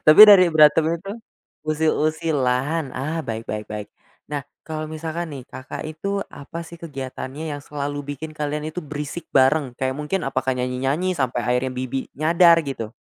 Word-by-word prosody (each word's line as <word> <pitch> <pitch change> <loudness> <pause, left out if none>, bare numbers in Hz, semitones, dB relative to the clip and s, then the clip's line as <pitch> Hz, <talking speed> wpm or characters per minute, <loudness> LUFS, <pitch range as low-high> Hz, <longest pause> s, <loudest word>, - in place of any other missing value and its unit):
Tapi 155 +6 +8
dari 195 -3 +9
berantem 155 0 +6 0.2
itu 195 +2 -7 0.5
usil-usilan, 155 -2 0
ah, 155 +5 -2
baik 115 0 -5
baik 105 0 -3
baik. 105 -1 -5 0.4
Nah, 145 -2 -3 0.2
kalau 155 -1 -4
misalkan 160 +1 -4
nih, 135 -3 -7
Kakak, 130 +3 -7
itu 200 +6 -3
apa 145 +4 -8
sih 170 +1 -11
kegiatannya 140 0 -6
yang 145 - -5
selalu 145 0 -4
bikin 155 +3 -7
kalian 150 0 -2
itu 160 +3 -5
berisik 150 +3 -5
bareng, 135 0 +4
kayak 130 0 -1
mungkin 150 +6 -2
apakah 130 -1 0
nyanyi-nyanyi 135 +8 0
sampai 125 -3 0
akhirnya 125 +1 0
bibi 130 +1 -3
nyadar 165 +3 +5
gitu? 115 -6 -5
150 Hz, 155 wpm, -23 LUFS, 130-160 Hz, 0.5 s, dari